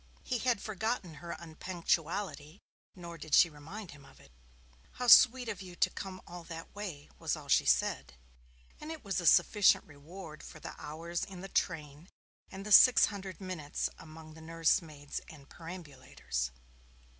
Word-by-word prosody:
He 250 Hz, -2 st, -2 dB
had 240 Hz, -2 st, +1 dB
forgotten 215 Hz, -3 st, -2 dB
her 170 Hz, 0 st, -5 dB
unpunctuality, 170 Hz, 0 st, -3 dB, 0.4 s
nor 170 Hz, -2 st, -9 dB
did 155 Hz, -, +1 dB
she 170 Hz, -, +6 dB
remind 165 Hz, +7 st, -9 dB
him 145 Hz, -1 st, -14 dB
of -, -, -18 dB
it. 70 Hz, -, -19 dB, 0.6 s
'How 250 Hz, -, -4 dB
sweet 250 Hz, +1 st, +8 dB
of 210 Hz, -3 st, -4 dB
you 180 Hz, -2 st, -10 dB
to -, -, +2 dB
come 185 Hz, -2 st, -7 dB
all 175 Hz, 0 st, -9 dB
that 165 Hz, -1 st, -9 dB
way,' 180 Hz, -9 st, -7 dB
was -, -, -1 dB
all -, -, -11 dB
she -, -, +3 dB
said, -, -, +1 dB, 0.6 s
and 305 Hz, -, -7 dB
it 320 Hz, -4 st, -8 dB
was 195 Hz, -2 st, -1 dB
a 170 Hz, -, 0 dB
sufficient 210 Hz, +4 st, +5 dB
reward 155 Hz, +2 st, -11 dB
for 155 Hz, -, -11 dB
the -, -, -7 dB
hours 165 Hz, +3 st, -4 dB
in 190 Hz, -3 st, -8 dB
the 195 Hz, -, -6 dB
train 155 Hz, -2 st, -2 dB, 0.4 s
and 195 Hz, +1 st, -8 dB
the 210 Hz, -, -5 dB
six 255 Hz, +4 st, +9 dB
hundred 190 Hz, -2 st, -7 dB
minutes 180 Hz, -7 st, -3 dB
among 155 Hz, 0 st, -12 dB
the 160 Hz, -, -13 dB
nursemaids 160 Hz, -2 st, -1 dB
and 140 Hz, -3 st, -14 dB
perambulators. 135 Hz, -, -5 dB
170 Hz, 165 wpm, -32 LUFS, 155-195 Hz, 0.6 s, six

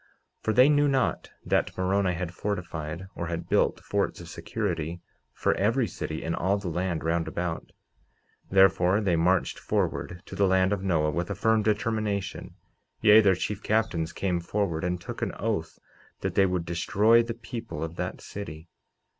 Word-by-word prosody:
49:13 -, -, -32 dB, 0.4 s
For 110 Hz, -, +2 dB
they 125 Hz, +5 st, +7 dB
knew 145 Hz, 0 st, +4 dB
not 135 Hz, -3 st, 0 dB, 0.2 s
that -, -, 0 dB
Moroni 95 Hz, 0 st, +1 dB
had 85 Hz, 0 st, -4 dB
fortified, 85 Hz, -4 st, -4 dB
or 85 Hz, -, -4 dB
had 85 Hz, 0 st, -4 dB
built -, -, +2 dB
forts -, -, -1 dB
of -, -, -10 dB
security, 85 Hz, -6 st, -3 dB, 0.3 s
for -, -, +1 dB
every 115 Hz, +6 st, +2 dB
city 85 Hz, -5 st, -5 dB
in 80 Hz, -, -2 dB
all 95 Hz, +4 st, +1 dB
the 100 Hz, -3 st, -4 dB
land 90 Hz, 0 st, -2 dB
round 80 Hz, 0 st, 0 dB
about; 85 Hz, -1 st, -4 dB, 0.8 s
therefore, 95 Hz, 0 st, +4 dB
they 95 Hz, -5 st, +1 dB
marched 90 Hz, +2 st, +1 dB
forward 90 Hz, 0 st, -2 dB
to -, -, -9 dB
the 100 Hz, -, +3 dB
land 95 Hz, +1 st, +3 dB
of 100 Hz, -, -2 dB
Noah 80 Hz, -5 st, +1 dB
with 85 Hz, +5 st, -2 dB
a 100 Hz, -, -2 dB
firm 110 Hz, +3 st, +2 dB
determination; 105 Hz, -2 st, -1 dB, 0.5 s
yea, 105 Hz, +1 st, +8 dB
their 95 Hz, -3 st, +4 dB
chief 100 Hz, +3 st, -3 dB
captains 100 Hz, -8 st, 0 dB
came 90 Hz, -3 st, -1 dB
forward 85 Hz, -2 st, -2 dB
and 90 Hz, 0 st, -1 dB
took -, -, -7 dB
an -, -, -1 dB
oath -, -, -3 dB, 0.4 s
that -, -, -2 dB
they 95 Hz, -, +4 dB
would 90 Hz, -2 st, -1 dB
destroy 105 Hz, +7 st, +3 dB
the 115 Hz, 0 st, -4 dB
people 115 Hz, -5 st, -6 dB
of 80 Hz, +1 st, -5 dB
that -, -, -4 dB
city. 85 Hz, -5 st, -8 dB
95 Hz, 175 wpm, -27 LUFS, 85-105 Hz, 0.8 s, yea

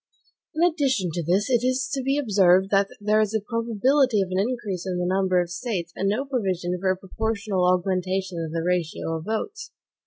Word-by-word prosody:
In 320 Hz, -, +1 dB
addition 265 Hz, -, 0 dB
to 175 Hz, -, -2 dB
this, 180 Hz, +6 st, +1 dB
it 245 Hz, -3 st, +2 dB
is 255 Hz, +1 st, +1 dB
to 275 Hz, -, -1 dB
be 270 Hz, +2 st, 0 dB
observed 195 Hz, -7 st, +3 dB
that 200 Hz, 0 st, +3 dB
there 210 Hz, +1 st, +2 dB
is 215 Hz, 0 st, 0 dB
a -, -, +3 dB
probability 230 Hz, +3 st, +1 dB
of 185 Hz, -, -7 dB
an 185 Hz, -, 0 dB
increase 200 Hz, -5 st, -2 dB
in 180 Hz, -1 st, -2 dB
the 180 Hz, -, -1 dB
number 185 Hz, 0 st, +2 dB
of 175 Hz, -1 st, -2 dB
States, 175 Hz, -4 st, -4 dB
and 195 Hz, -, 0 dB
no 235 Hz, +7 st, -1 dB
provision 190 Hz, -9 st, -1 dB
for 190 Hz, +1 st, 0 dB
a 185 Hz, -, +1 dB
proportional 200 Hz, -2 st, -1 dB
augmentation 185 Hz, -1 st, -1 dB
of 160 Hz, -, -5 dB
the 165 Hz, 0 st, -2 dB
ratio 170 Hz, -2 st, -1 dB
of 160 Hz, -, -9 dB
votes. 420 Hz, -, -4 dB
195 Hz, 205 wpm, -24 LUFS, 180-235 Hz, -, observed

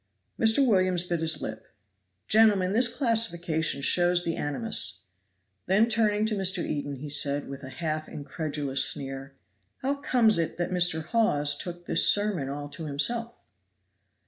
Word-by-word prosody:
Mr. 225 Hz, +5 st, +4 dB
Williams 185 Hz, -5 st, +2 dB
bit 170 Hz, -2 st, -1 dB
his 160 Hz, 0 st, -1 dB
lip. 110 Hz, 0 st, -6 dB, 0.6 s
"Gentlemen, 205 Hz, -4 st, +4 dB
this 240 Hz, +3 st, +4 dB
classification 175 Hz, -, -1 dB
shows 175 Hz, +2 st, +3 dB
the 165 Hz, -, -2 dB
animus;" 145 Hz, -, -1 dB, 0.6 s
then 205 Hz, +5 st, +3 dB
turning 215 Hz, -2 st, +1 dB
to 220 Hz, -, -1 dB
Mr. 190 Hz, -2 st, +1 dB
Eden 145 Hz, -1 st, -4 dB
he 140 Hz, +3 st, -8 dB
said, 145 Hz, -1 st, 0 dB
with 135 Hz, 0 st, -8 dB
a 130 Hz, -, -9 dB
half 155 Hz, +2 st, -4 dB
incredulous 145 Hz, -2 st, -2 dB
sneer, 135 Hz, 0 st, -3 dB, 0.5 s
"How 275 Hz, +2 st, +1 dB
comes 245 Hz, -8 st, +2 dB
it 165 Hz, -, -2 dB
that 175 Hz, +1 st, -2 dB
Mr. 175 Hz, -3 st, +1 dB
Hawes 150 Hz, -8 st, +1 dB
took 175 Hz, +3 st, -7 dB
this -, -, +3 dB
sermon 205 Hz, -9 st, -1 dB
all 145 Hz, +1 st, -5 dB
to 160 Hz, -, -8 dB
himself?" 230 Hz, +12 st, -1 dB
170 Hz, 145 wpm, -27 LUFS, 145-215 Hz, 0.6 s, Mr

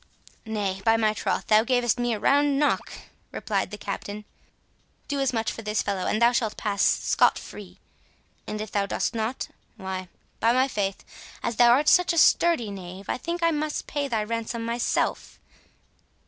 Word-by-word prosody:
"Nay, 200 Hz, -3 st, -2 dB
by 225 Hz, +1 st, +4 dB
my 215 Hz, -1 st, +2 dB
troth, -, -, -2 dB
thou 215 Hz, 0 st, +5 dB
gavest 245 Hz, -1 st, +1 dB
me 240 Hz, 0 st, 0 dB
a -, -, -6 dB
round 285 Hz, +3 st, +3 dB
knock," 295 Hz, 0 st, +1 dB, 0.4 s
replied 200 Hz, -4 st, -2 dB
the 210 Hz, -, -7 dB
Captain; 205 Hz, +1 st, -6 dB, 0.8 s
"do 285 Hz, -1 st, -2 dB
as 270 Hz, -2 st, +1 dB
much 225 Hz, -2 st, -1 dB
for -, -, -7 dB
this 210 Hz, -1 st, -1 dB
fellow, 195 Hz, -2 st, -2 dB
and 215 Hz, -, 0 dB
thou 235 Hz, 0 st, +5 dB
shalt 225 Hz, -3 st, -1 dB
pass 200 Hz, -2 st, -2 dB
scot -, -, +3 dB
free; -, -, -10 dB, 0.7 s
and 215 Hz, -, -4 dB
if 215 Hz, 0 st, -6 dB
thou 200 Hz, -1 st, 0 dB
dost -, -, -1 dB
not—why, 190 Hz, -5 st, -5 dB, 0.3 s
by 230 Hz, +1 st, +3 dB
my 260 Hz, +2 st, +3 dB
faith, 195 Hz, -6 st, -3 dB, 0.4 s
as 235 Hz, -, -2 dB
thou 240 Hz, -1 st, +6 dB
art 275 Hz, +5 st, +4 dB
such 360 Hz, -1 st, +5 dB
a -, -, -3 dB
sturdy 315 Hz, -9 st, +4 dB
knave, 185 Hz, 0 st, -9 dB
I -, -, -1 dB
think 340 Hz, +5 st, -4 dB
I 335 Hz, -, +4 dB
must 305 Hz, -1 st, -2 dB
pay 290 Hz, -1 st, -2 dB
thy 225 Hz, -5 st, -1 dB
ransom 230 Hz, +1 st, -3 dB
myself. 235 Hz, +1 st, -1 dB
225 Hz, 175 wpm, -25 LUFS, 205-260 Hz, 0.8 s, thou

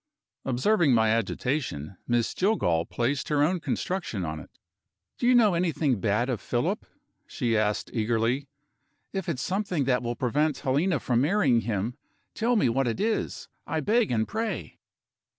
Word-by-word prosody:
Observing 135 Hz, -, +3 dB
my 110 Hz, -1 st, +3 dB
agitation, 115 Hz, -, -2 dB
Miss 120 Hz, -1 st, +1 dB
Jillgall 90 Hz, -, +1 dB
placed 130 Hz, +3 st, -1 dB
her 145 Hz, -1 st, +3 dB
own 175 Hz, +4 st, +1 dB
construction 165 Hz, -, -2 dB
on 80 Hz, 0 st, -4 dB
it. -, -, -12 dB, 0.7 s
"Do 240 Hz, -, +1 dB
you 250 Hz, -, +6 dB
know 220 Hz, -5 st, +5 dB
anything 165 Hz, -, +1 dB
bad 110 Hz, +4 st, +1 dB
of 125 Hz, -5 st, -2 dB
Philip?" -, -, -1 dB, 0.4 s
she 115 Hz, -2 st, -1 dB
asked 105 Hz, -1 st, 0 dB
eagerly. 115 Hz, +4 st, 0 dB, 0.7 s
"If 190 Hz, -3 st, -3 dB
it's 145 Hz, -4 st, -2 dB
something 185 Hz, -5 st, -1 dB
that 125 Hz, -1 st, +1 dB
will 120 Hz, 0 st, -3 dB
prevent 145 Hz, +4 st, 0 dB
Helena 145 Hz, +5 st, +1 dB
from 120 Hz, -1 st, +1 dB
marrying 145 Hz, -, +3 dB
him, 110 Hz, +2 st, -2 dB, 0.4 s
tell 235 Hz, +2 st, +1 dB
me 210 Hz, -, +3 dB
what 130 Hz, +2 st, +1 dB
it 115 Hz, -, -2 dB
is, 220 Hz, +2 st, -1 dB, 0.2 s
I -, -, -1 dB
beg 225 Hz, +1 st, +2 dB
and 110 Hz, -2 st, +1 dB
pray." 220 Hz, 0 st, -4 dB
130 Hz, 155 wpm, -27 LUFS, 115-180 Hz, 0.7 s, you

